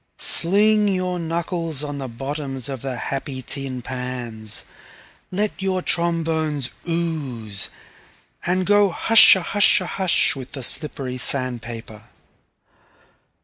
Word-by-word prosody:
Sling 210 Hz, +4 st, +3 dB
your 185 Hz, -2 st, -1 dB
knuckles 165 Hz, -2 st, -1 dB
on 145 Hz, -1 st, -5 dB
the 135 Hz, -, -5 dB
bottoms 135 Hz, +1 st, -3 dB
of 135 Hz, -3 st, -5 dB
the 135 Hz, -2 st, -4 dB
happy 135 Hz, 0 st, -5 dB
tin 130 Hz, -2 st, -3 dB
pans, 120 Hz, -4 st, -4 dB, 0.7 s
let 205 Hz, +2 st, -2 dB
your 190 Hz, -1 st, -1 dB
trombones 160 Hz, -5 st, 0 dB, 0.2 s
ooze, 140 Hz, -12 st, -2 dB, 0.7 s
and 185 Hz, +1 st, 0 dB
go 205 Hz, 0 st, +4 dB
hushahusha 205 Hz, 0 st, +6 dB
hush 185 Hz, -4 st, +2 dB
with 130 Hz, -1 st, -9 dB
the 135 Hz, -, -6 dB
slippery 130 Hz, -2 st, -2 dB
sand 130 Hz, -2 st, 0 dB
paper. 115 Hz, -2 st, -9 dB
145 Hz, 105 wpm, -21 LUFS, 130-180 Hz, 0.7 s, hushahusha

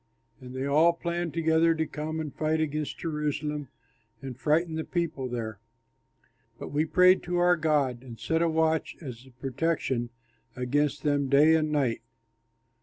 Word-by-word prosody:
And 130 Hz, -1 st, -10 dB
they 130 Hz, +1 st, -2 dB
all 155 Hz, +4 st, +4 dB
planned 170 Hz, 0 st, -3 dB
together 165 Hz, 0 st, +3 dB
to 160 Hz, 0 st, 0 dB
come 155 Hz, +1 st, -4 dB
and 155 Hz, -3 st, -5 dB
fight 155 Hz, 0 st, 0 dB
against 155 Hz, -1 st, -2 dB
Jerusalem 150 Hz, -2 st, -3 dB, 0.5 s
and 135 Hz, -2 st, -7 dB
frighten 160 Hz, +6 st, +1 dB
the 160 Hz, 0 st, -2 dB
people 160 Hz, -7 st, -2 dB
there. 110 Hz, -4 st, -4 dB, 1.0 s
But -, -, -8 dB
we 150 Hz, +2 st, +1 dB
prayed 185 Hz, +2 st, +5 dB
to 175 Hz, 0 st, -2 dB
our 175 Hz, 0 st, +4 dB
God 145 Hz, -6 st, +1 dB
and 120 Hz, -4 st, -11 dB
set 160 Hz, +7 st, 0 dB
a 170 Hz, -, +3 dB
watch 160 Hz, 0 st, +1 dB
as 130 Hz, -4 st, -9 dB
a -, -, -14 dB
protection 130 Hz, -1 st, -2 dB, 0.5 s
against 140 Hz, +4 st, 0 dB
them 145 Hz, -2 st, +1 dB
day 145 Hz, +4 st, +6 dB
and 155 Hz, -1 st, +2 dB
night. 135 Hz, -6 st, 0 dB
150 Hz, 160 wpm, -28 LUFS, 135-160 Hz, 1.0 s, day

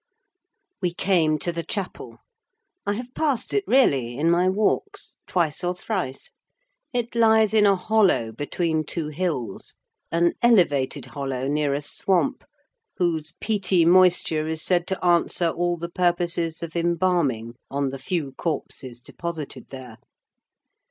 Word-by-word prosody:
We 175 Hz, -2 st, -1 dB
came 165 Hz, -6 st, +2 dB
to 175 Hz, -, -1 dB
the 170 Hz, 0 st, -3 dB
chapel. 190 Hz, +2 st, -5 dB, 0.7 s
I 205 Hz, -, +2 dB
have 245 Hz, +4 st, -6 dB
passed 290 Hz, -6 st, -1 dB
it 410 Hz, -, +2 dB
really 135 Hz, -, +3 dB
in 165 Hz, +4 st, +2 dB
my 180 Hz, +2 st, +3 dB
walks, 215 Hz, -, -1 dB
twice 170 Hz, -2 st, 0 dB
or 180 Hz, +1 st, 0 dB
thrice; 180 Hz, -, -4 dB, 0.6 s
it 240 Hz, -2 st, -2 dB
lies 220 Hz, -2 st, +4 dB
in 210 Hz, -2 st, +5 dB
a 200 Hz, -, +5 dB
hollow, 190 Hz, -, +2 dB
between 155 Hz, +6 st, -1 dB
two 155 Hz, 0 st, -4 dB
hills: 150 Hz, -, -3 dB, 0.4 s
an 170 Hz, +1 st, +2 dB
elevated 145 Hz, -, +3 dB
hollow, 135 Hz, 0 st, -4 dB
near 145 Hz, -1 st, 0 dB
a 145 Hz, -, -3 dB
swamp, 190 Hz, -, 0 dB, 0.5 s
whose 160 Hz, -3 st, -1 dB
peaty 190 Hz, -5 st, +1 dB
moisture 175 Hz, -3 st, +4 dB
is 160 Hz, 0 st, -3 dB
said 175 Hz, -1 st, +1 dB
to 190 Hz, -1 st, -3 dB
answer 170 Hz, 0 st, +2 dB
all 175 Hz, +1 st, -1 dB
the 170 Hz, +1 st, -5 dB
purposes 170 Hz, -2 st, 0 dB
of 165 Hz, 0 st, -7 dB
embalming 170 Hz, -9 st, 0 dB, 0.2 s
on 140 Hz, 0 st, -1 dB
the 135 Hz, 0 st, -7 dB
few 150 Hz, -1 st, -2 dB
corpses 130 Hz, -4 st, -5 dB
deposited 165 Hz, +2 st, -7 dB
there. 130 Hz, -4 st, -10 dB
170 Hz, 140 wpm, -24 LUFS, 145-185 Hz, 0.7 s, in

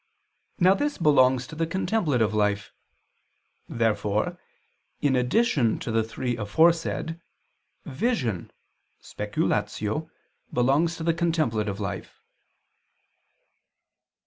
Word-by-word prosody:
']." -, -, -48 dB, 0.2 s
Now 185 Hz, +2 st, +6 dB
this 290 Hz, +8 st, -1 dB
belongs 130 Hz, -5 st, +4 dB
to 160 Hz, -, -10 dB
the 165 Hz, +1 st, -1 dB
contemplative 160 Hz, -, 0 dB
life. 105 Hz, 0 st, 0 dB, 1.0 s
Therefore 110 Hz, -2 st, 0 dB, 0.6 s
in 140 Hz, -2 st, +2 dB
addition 125 Hz, -, +2 dB
to -, -, -5 dB
the 115 Hz, 0 st, +2 dB
three 120 Hz, +2 st, -3 dB
aforesaid, 165 Hz, +8 st, +1 dB, 0.6 s
vision 130 Hz, -, -1 dB, 0.5 s
(speculatio) 110 Hz, +10 st, -2 dB, 0.4 s
belongs 145 Hz, +7 st, +2 dB
to 160 Hz, -, -5 dB
the 165 Hz, 0 st, +2 dB
contemplative 130 Hz, -, 0 dB
life. 100 Hz, -3 st, -5 dB
130 Hz, 95 wpm, -26 LUFS, 110-165 Hz, 1.0 s, Now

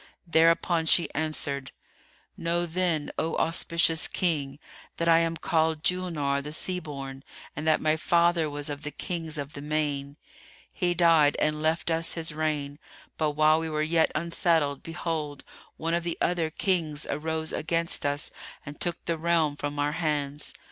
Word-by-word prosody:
Thereupon 165 Hz, 0 st, +3 dB
she 170 Hz, -, +4 dB
answered, 145 Hz, -3 st, -2 dB, 0.6 s
"Know, 170 Hz, +1 st, 0 dB
then, 170 Hz, -3 st, 0 dB
O 160 Hz, +1 st, -1 dB
auspicious 165 Hz, 0 st, +2 dB
King, 145 Hz, -6 st, 0 dB, 0.4 s
that 170 Hz, -, -1 dB
I 165 Hz, 0 st, +6 dB
am 165 Hz, 0 st, 0 dB
called 160 Hz, -1 st, +1 dB
Julnár[FN#308] 155 Hz, -7 st, 0 dB
the 150 Hz, -, -6 dB
Sea 180 Hz, +4 st, -1 dB
born 135 Hz, -4 st, -7 dB, 0.3 s
and 150 Hz, +2 st, -4 dB
that 155 Hz, -, +4 dB
my 155 Hz, 0 st, +3 dB
father 170 Hz, -1 st, +2 dB
was 145 Hz, 0 st, -4 dB
of 145 Hz, 0 st, -6 dB
the 150 Hz, -, -4 dB
Kings 160 Hz, +1 st, -4 dB
of 145 Hz, 0 st, -5 dB
the 140 Hz, -, -7 dB
Main. 145 Hz, -1 st, -2 dB, 0.6 s
He 175 Hz, -2 st, 0 dB
died 165 Hz, -4 st, +5 dB
and 150 Hz, 0 st, +1 dB
left 160 Hz, +2 st, +1 dB
us 165 Hz, 0 st, 0 dB
his 160 Hz, -2 st, -2 dB
reign, 150 Hz, -2 st, -2 dB, 0.4 s
but 155 Hz, -2 st, +1 dB
while 155 Hz, +1 st, +4 dB
we 160 Hz, 0 st, -3 dB
were 155 Hz, 0 st, 0 dB
yet 160 Hz, +1 st, +3 dB
unsettled, 165 Hz, -3 st, +1 dB
behold, 160 Hz, -4 st, -4 dB, 0.3 s
one 165 Hz, +1 st, -1 dB
of 170 Hz, 0 st, +1 dB
the 170 Hz, -1 st, -3 dB
other 170 Hz, -3 st, +1 dB
Kings 155 Hz, -4 st, 0 dB
arose 160 Hz, +1 st, -2 dB
against 165 Hz, +2 st, -1 dB
us 145 Hz, +1 st, 0 dB, 0.3 s
and 145 Hz, 0 st, -9 dB
took 175 Hz, -1 st, -2 dB
the 165 Hz, -1 st, -1 dB
realm 165 Hz, -3 st, +2 dB
from 145 Hz, 0 st, -4 dB
our 145 Hz, 0 st, +1 dB
hands. 150 Hz, -3 st, -2 dB
160 Hz, 160 wpm, -27 LUFS, 150-165 Hz, 0.6 s, I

